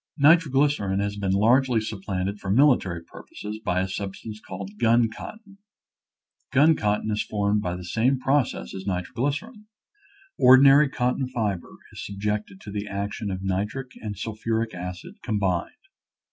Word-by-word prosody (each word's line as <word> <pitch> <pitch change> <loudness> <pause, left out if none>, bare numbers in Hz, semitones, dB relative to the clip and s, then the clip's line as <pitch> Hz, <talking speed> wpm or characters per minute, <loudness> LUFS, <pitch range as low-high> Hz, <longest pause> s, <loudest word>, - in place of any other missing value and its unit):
Nitroglycerin 145 - +3
has 100 0 -1
been 100 -2 -1
largely 120 +5 +3
supplanted 100 -2 -3
for 100 - -6
military 100 - +3
purposes 105 +5 -9
by 90 +1 +1
a 95 - -1
substance 100 +2 -6
called 100 +1 -9
gun 115 -1 +3
cotton. 205 -3 -11 0.9
Gun 150 +5 +5
cotton 105 -1 0
is 105 - 0
formed 105 0 0
by 90 -2 -2
the 90 0 -8
same 120 +9 +1
process 130 - 0
as 95 0 -7
nitroglycerin. 145 - -3 0.7
Ordinary 135 +3 +7
cot 125 0 -1
ton 130 - -1
fiber 105 -8 -2 0.2
is - - -7
subjected 100 -1 -3
to 105 - -9
the 105 +1 -4
action 100 +1 -4
of 95 0 -4
nitric 105 +7 -2
and 105 -3 -5
sulphuric 110 +1 -2
acid 90 0 -8
combined. 100 -6 -1
105 Hz, 145 wpm, -25 LUFS, 95-130 Hz, 0.9 s, Ordinary